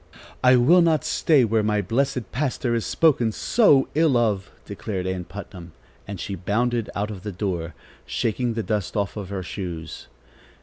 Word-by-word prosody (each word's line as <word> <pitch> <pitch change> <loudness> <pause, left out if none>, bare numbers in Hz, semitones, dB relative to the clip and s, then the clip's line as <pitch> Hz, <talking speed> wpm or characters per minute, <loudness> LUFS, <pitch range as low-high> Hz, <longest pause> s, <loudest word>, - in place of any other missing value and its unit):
"I 130 0 +7
will 150 +9 +5
not 165 -2 +2
stay 145 -6 +3
where 110 0 +1
my 105 0 +1
blessed 115 +2 -1
pastor 130 -3 -1
is 115 -2 -1
spoken 130 -8 +3
so 145 - +3
ill 155 -4 +3
of!" 105 -5 0 0.2
declared 100 -2 -5
Ann 95 -1 -3
Putnam, 90 -2 -10 0.3
and 100 -2 -6
she 100 +5 -4
bounded 115 +5 -1
out 105 +2 -2
of 100 -3 -8
the 105 +2 -5
door, 85 -4 -3 0.3
shaking 115 - -1
the 115 - -2
dust 105 -3 -2
off 100 -1 -1
her 100 -2 -5
shoes. 85 -4 -6
105 Hz, 165 wpm, -23 LUFS, 95-125 Hz, 0.3 s, I